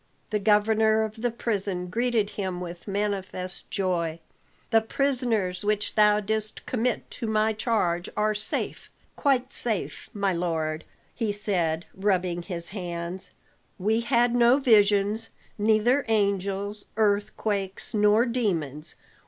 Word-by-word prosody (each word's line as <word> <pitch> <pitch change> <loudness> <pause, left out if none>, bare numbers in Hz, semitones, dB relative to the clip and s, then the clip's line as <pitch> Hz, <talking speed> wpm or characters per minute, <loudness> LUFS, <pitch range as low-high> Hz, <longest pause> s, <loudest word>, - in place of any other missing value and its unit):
The 210 - +1
governor 220 +1 +3
of 220 +1 -5
the 245 - +2
prison 200 -6 -2
greeted 225 +1 0
him 190 -3 -3
with 175 +1 -8
manifest 195 -3 -3
joy. 170 -4 -1 0.5
"The 225 -1 +5
prisoners 225 -7 0
which 210 0 0
thou 210 -1 +5
didst 215 +1 -3
commit 245 0 -1
to 230 - -5
my 220 0 +2
charge 205 -6 0
are 215 0 +2
safe 210 0 -3 0.3
quite 265 -3 +1
safe, 220 -5 -2
my 200 -2 0
lord," 160 -2 -2 0.3
he 225 -3 -1
said, 180 -6 -1
rubbing 185 -3 0
his 170 -1 -5
hands. 175 -1 -5 0.5
"We 215 +4 +1
had 235 0 +2
no 245 +1 +5
visions; 210 -3 +3 0.3
neither 220 +6 +3
angels, 200 -1 0
earthquakes, 205 -2 -1
nor 210 +2 +4
demons. 165 - -1
210 Hz, 120 wpm, -26 LUFS, 185-220 Hz, 0.5 s, The